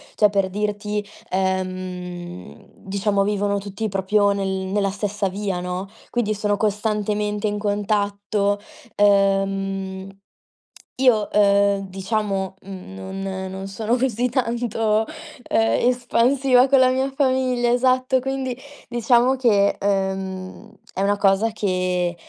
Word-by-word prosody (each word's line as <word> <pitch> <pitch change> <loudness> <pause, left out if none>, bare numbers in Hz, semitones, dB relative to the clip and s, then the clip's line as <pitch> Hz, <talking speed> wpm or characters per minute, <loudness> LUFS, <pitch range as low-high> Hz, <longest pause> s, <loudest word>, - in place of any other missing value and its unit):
Cioè, 210 - +5
per 195 -2 +1
dirti, 210 +1 -2 0.2
ehm, 185 - -4
diciamo, 200 +1 0
vivono 205 0 0
tutti 200 +2 -4
proprio 200 +1 +2
nel 195 -1 -2
nella 190 +1 -1
stessa 205 0 -2
via, 195 -1 -3
no, 180 +2 -4 0.2
quindi 230 -3 0
sono 205 0 0
costantemente 210 0 -1
in 210 0 -2
contatto, 205 0 0 0.4
ehm, 195 -1 +1 0.9
io, 220 -6 +3
ehm, 200 -1 +3
diciamo, 195 0 -2
mhmm, 185 - -9 0.3
non 190 -1 -4
non 190 +1 -6
sono 215 +4 -1
così 250 -1 0
tanto, 230 -3 0 0.4
ehm, 225 +2 +2
espansiva 250 +1 +3
con 275 0 +4
la 255 - +5
mia 260 +1 0
famiglia 255 -3 +1
esatto, 255 +1 +2
quindi, 265 -1 -3 0.3
diciamo 240 +2 +3
che, 210 -6 +3
ehm, 190 -1 -2 0.2
è 190 - -3
una 200 +1 +2
cosa 200 +3 +3
che, 185 -4 -1
205 Hz, 115 wpm, -22 LUFS, 195-225 Hz, 0.9 s, Cioè